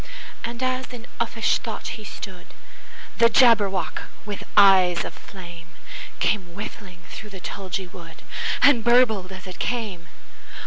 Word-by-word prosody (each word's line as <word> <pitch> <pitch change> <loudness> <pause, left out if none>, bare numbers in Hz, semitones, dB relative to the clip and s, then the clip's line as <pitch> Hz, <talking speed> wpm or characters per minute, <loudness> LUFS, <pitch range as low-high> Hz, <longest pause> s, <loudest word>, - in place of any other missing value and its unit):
And 235 +2 -4
as 255 0 -1
in 240 -1 -9
uffish 230 -1 +1
thought 225 -3 -5
he 215 - -7
stood, 190 -3 -9 0.6
The 230 - +7
Jabberwock, 205 -9 +3 0.2
with 205 -2 -5 0.2
eyes 185 -3 +6
of - - -6
flame, 175 -3 -11 0.5
Came 180 -5 0
whiffling 190 -3 -8
through 215 - -8
the 195 -2 -9
tulgey 190 0 -4
wood, 170 -2 -12 0.4
And 250 -6 +6
burbled 220 -6 +4
as 185 -1 -9
it 185 -1 -9
came! 210 -8 -3
200 Hz, 135 wpm, -24 LUFS, 180-230 Hz, 0.6 s, The